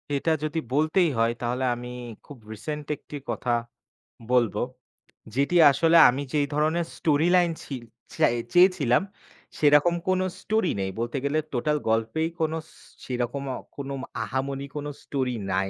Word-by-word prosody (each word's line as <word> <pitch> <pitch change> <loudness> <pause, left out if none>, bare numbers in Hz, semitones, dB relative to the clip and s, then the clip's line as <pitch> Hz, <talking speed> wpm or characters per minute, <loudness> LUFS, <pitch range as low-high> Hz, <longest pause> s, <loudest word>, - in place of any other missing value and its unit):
এটা 150 +4 0
যদি 155 +1 -1
বলতেই 155 +4 +3
হয় 115 +1 +2
তাহলে 125 +2 -1
আমি 120 +1 -7 0.4
খুব 145 - -11 0.2
রিসেন্ট 150 +7 -5
একটি 150 - -9
কথা 120 +1 -1 0.8
বলব। 120 -5 +3 0.8
যেটি 140 +6 +1 0.2
আসলে 165 +4 +4
আমি 130 +3 -1
যেই 145 -2 +2
ধরনের 155 +3 +1
স্টোরি 155 +1 +2
লাইন 175 -2 +4
ছি 140 - -6 0.4
চাই 120 - +3 0.2
চেয়েছিলাম 180 -8 +4 0.5
সেরকম 150 +3 +5
কোনো 185 0 +2 0.2
স্টোরি 215 -3 +1
নেই 95 0 -2
বলতে 120 +3 -2
গেলে 145 +2 +1
টোটাল 150 +4 +1
গল্পেই 115 +9 0
কোনো 160 0 0
সো - - -20 0.3
সেরকম 125 +2 -3
অ - - -5 0.2
কোনো 140 -1 -5 0.3
আহামনি 135 +4 -3
কোনো 145 0 -4
স্টোরি 130 -3 -2 0.2
নাই। 95 +1 0
145 Hz, 145 wpm, -26 LUFS, 125-160 Hz, 0.8 s, সেরকম